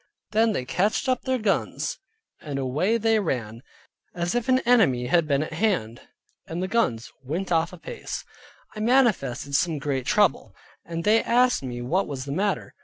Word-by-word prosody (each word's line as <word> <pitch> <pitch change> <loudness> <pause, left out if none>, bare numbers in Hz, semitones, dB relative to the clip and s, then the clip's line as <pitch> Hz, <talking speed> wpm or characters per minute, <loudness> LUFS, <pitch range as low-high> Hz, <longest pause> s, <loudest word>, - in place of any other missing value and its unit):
Then 220 +1 +3
they 125 - -2
catched 200 - 0
up 255 -1 +1
their 260 -1 +1
guns, 215 -4 -1 0.4
and 145 -3 -5
away 150 - +1
they 225 0 +2
ran, 115 - -3 0.5
as 175 0 -1
if 240 +1 -1
an 255 - +5
enemy 200 - +3
had 160 +5 +2
been 140 0 +2
at 155 - -7
hand, 160 - -1 0.5
and 170 +3 -3
the - - -1
guns 185 - 0
went 170 +8 -3
off 165 0 +2
apace. 180 -2 -7 0.5
I - - -6
manifested 215 - +1
some 165 +2 +1
great 135 -2 -2
trouble, 205 -4 +2 0.3
and 165 0 -5
they 220 +4 +4
asked 245 +1 +3
me 120 -2 -5
what 180 +10 0
was 135 -3 -5
the 140 - -5
matter? 195 +6 -1
175 Hz, 175 wpm, -25 LUFS, 135-220 Hz, 0.5 s, an